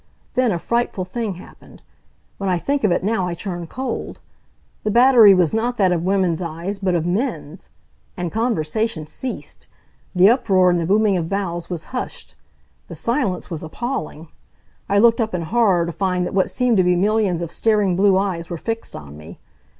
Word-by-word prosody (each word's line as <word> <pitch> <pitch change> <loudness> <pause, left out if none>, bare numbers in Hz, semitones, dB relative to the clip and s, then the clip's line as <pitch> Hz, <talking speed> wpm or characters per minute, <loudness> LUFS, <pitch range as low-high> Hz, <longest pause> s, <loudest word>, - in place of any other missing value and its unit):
Then 255 -3 +2
a 175 - 0
frightful 235 -1 -1
thing 210 0 -4
happened. 180 - -15 0.6
When 195 -1 -2
I 180 - +2
think 280 +9 -1
of 210 - +3
it 175 - 0
now 195 -3 0
I 175 - -3
turn 175 -2 -5
cold. 260 +8 -5 0.6
The 215 - 0
battery 235 -3 +7
was 175 -4 +2
not 240 +2 -1
that 190 -3 +3
of 175 0 -1
women's 185 -4 +1
eyes, 170 +4 -4
but 185 -2 0
of 165 -1 0
men's. 175 - -3 0.5
And 175 -2 -3
conversation 220 -5 -1
ceased! 250 +11 -7 0.5
The 180 +2 +6
uproar 195 -6 +4
and 175 - +1
the 165 - -2
booming 205 0 +3
of 165 -2 -2
vowels 175 -3 -3
was 175 -3 -4
hushed. 250 - -5 0.5
The - - -9
silence 230 -9 -2
was 165 - -4
appalling. 160 - -5 0.6
I 200 - +2
looked 230 +2 +5
up 220 -4 -2
in 170 - -2
horror 195 -3 +2
to 170 - -4
find 180 0 -1
that - - -5
what 190 -1 +2
seemed 250 -3 +1
to 185 - +4
be 180 0 +3
millions 195 -2 +1
of 170 - -6
staring 210 -4 +1
blue 195 0 +4
eyes 185 -4 -2
were 170 - -4
fixed 225 +6 -5
on 75 -1 -10
me. 75 +1 -12
190 Hz, 190 wpm, -20 LUFS, 175-225 Hz, 0.6 s, battery